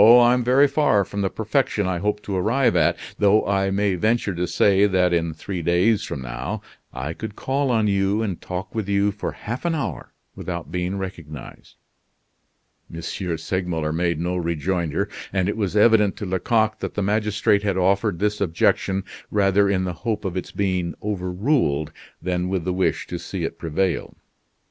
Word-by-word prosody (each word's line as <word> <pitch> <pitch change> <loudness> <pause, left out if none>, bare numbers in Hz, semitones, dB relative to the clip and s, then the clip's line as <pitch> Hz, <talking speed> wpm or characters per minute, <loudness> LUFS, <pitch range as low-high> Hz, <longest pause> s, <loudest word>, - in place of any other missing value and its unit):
I'm 120 +3 +7
very 130 +4 +5
far 135 -8 +2
from 100 +3 -4
the 95 - +1
perfection 110 -1 0
I 90 -1 -1
hope 105 +2 -1
to 100 - -3
arrive 115 +4 +2
at; 85 +1 +3 0.2
though 105 +1 +4
I 95 -1 +1
may 100 0 +1
venture 110 +2 +1
to 90 +1 -2
say 100 0 +4
that 90 -2 +2
in 85 -1 +1
three 85 +3 -5
days 90 +6 +2
from 65 - -5
now 65 +1 -5 0.3
I 70 +5 -4
could 105 +3 -7
call 135 +1 -1
on 115 -3 +2
you 100 +1 +1
and 95 -6 -3
talk 95 +2 -5
with 110 -3 -3
you 100 +1 +2
for 105 - -4
half 120 +4 -6
an 170 -1 +1
hour 150 - -4 0.2
without 85 -4 -5
being 90 +2 -2
recognized." 85 -8 -8 1.2
M. 85 - -7
Segmuller 85 -2 -2
made 85 -1 0
no 90 +2 -1
rejoinder; 85 +1 -1 0.2
and 95 -2 +1
it 105 - -1
was 105 -2 -1
evident 105 -2 +5
to 105 - -4
Lecoq 110 +4 +1
that - - -5
the 105 - 0
magistrate 105 0 +2
had 100 -2 0
offered 100 +1 +2
this 105 +2 -1
objection 95 +2 +1 0.3
rather 100 -1 +3
in 95 -2 +1
the 90 -1 -2
hope 110 -4 -2
of 95 -2 -2
its 95 - -3
being 90 -4 -1
overruled, 90 - 0 0.3
than 90 +1 -1
with 95 -3 -1
the 90 - 0
wish 95 0 0
to - - -5
see - - -5
it - - -4
prevail. 85 +3 -1
95 Hz, 175 wpm, -23 LUFS, 90-105 Hz, 1.2 s, I'm